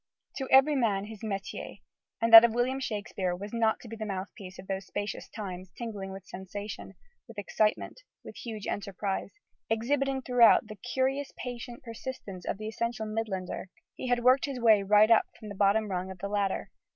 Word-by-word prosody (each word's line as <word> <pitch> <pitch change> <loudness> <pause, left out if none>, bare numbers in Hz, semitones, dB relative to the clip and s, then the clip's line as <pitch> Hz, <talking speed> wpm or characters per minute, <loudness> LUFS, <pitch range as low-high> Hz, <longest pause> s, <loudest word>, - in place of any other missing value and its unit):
To 265 - -3
every 270 +3 +6
man 205 -6 +1
his 215 -1 -10
métier: 200 -3 -5 0.4
and 230 0 0
that 225 0 +14
of 235 -1 +2
William 255 +2 +1
Shakespeare 200 -6 -2
was 205 +4 -8
not 225 -1 +2
to - - -11
be 225 - -7
the 220 - -5
mouthpiece 190 -1 -6
of - - -10
those 195 0 -4
"spacious 205 0 -4
times," 185 -3 -7
tingling 205 -5 -5
with 190 -1 -9
sensation, 200 +3 -7 0.3
with 230 -2 -13
excitement, 210 - -1 0.2
with - - -10
huge 220 -4 -6
enterprise. 200 -1 -3 0.4
Exhibiting, 265 +4 0
throughout, 245 -2 +6
the 215 0 -9
curious 265 +4 -1
patient 245 0 -7
persistence 230 -5 -7
of - - -1
the 215 +1 -6
essential 225 0 -3
Midlander, 215 -4 -3 0.3
he - - -6
had 245 -1 +1
worked 255 +2 +5
his 275 -3 -5
way 220 -3 +5
right 210 +3 +5
up 225 - +5
from 215 - -9
the - - -6
bottom 205 +2 +2
rung 185 0 -2
of 190 - -8
the 200 +2 -5
ladder. 200 -2 -1
215 Hz, 185 wpm, -29 LUFS, 195-240 Hz, 0.4 s, that